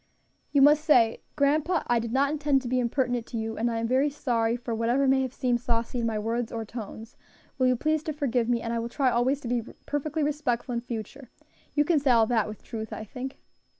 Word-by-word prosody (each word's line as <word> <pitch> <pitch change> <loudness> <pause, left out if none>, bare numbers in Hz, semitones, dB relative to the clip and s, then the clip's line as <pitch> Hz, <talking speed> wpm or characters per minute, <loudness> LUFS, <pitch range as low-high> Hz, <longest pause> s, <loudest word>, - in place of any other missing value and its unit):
"You 280 -2 +5
must 300 +1 +6
say, 240 -8 +4
Grandpa, 305 +4 +2
I 240 -1 +2
did 230 0 -4
not 275 +3 +2
intend 290 -3 +1
to - - -5
be 255 +1 +1
impertinent 245 -1 0
to 235 - -5
you, 225 0 -3
and 235 +2 0
I 230 - -2
am 225 0 -1
very 265 +4 +2
sorry 235 -5 0
for 240 -1 -5
whatever 240 +5 +1
may 265 0 +4
have 260 -2 -2
seemed 245 -2 0
saucy 235 0 -1
in 230 - 0
my 220 -1 -1
words 230 +2 -2
or 225 -1 -4
tones; 220 0 -8 0.4
will 255 - +4
you 255 - +3
please 310 +4 0
to 310 - -2
forgive 250 -5 0
me, 235 -1 +1
and 230 0 -2
I 230 - 0
will 230 +1 -3
try 260 0 +1
always 260 +4 +1
to 245 - -6
be 240 0 0 0.2
perfectly 295 +2 -2
respectful 280 -4 -1
in 235 - -1
future. 240 +2 -7 0.5
You 295 0 +3
can 320 -1 +3
say 280 -1 0
all 230 -2 +6
that 220 -2 +1
with 215 0 -9
truth, 220 -2 -6
I - - -5
think?" 255 +4 -7
245 Hz, 240 wpm, -27 LUFS, 230-280 Hz, 0.5 s, must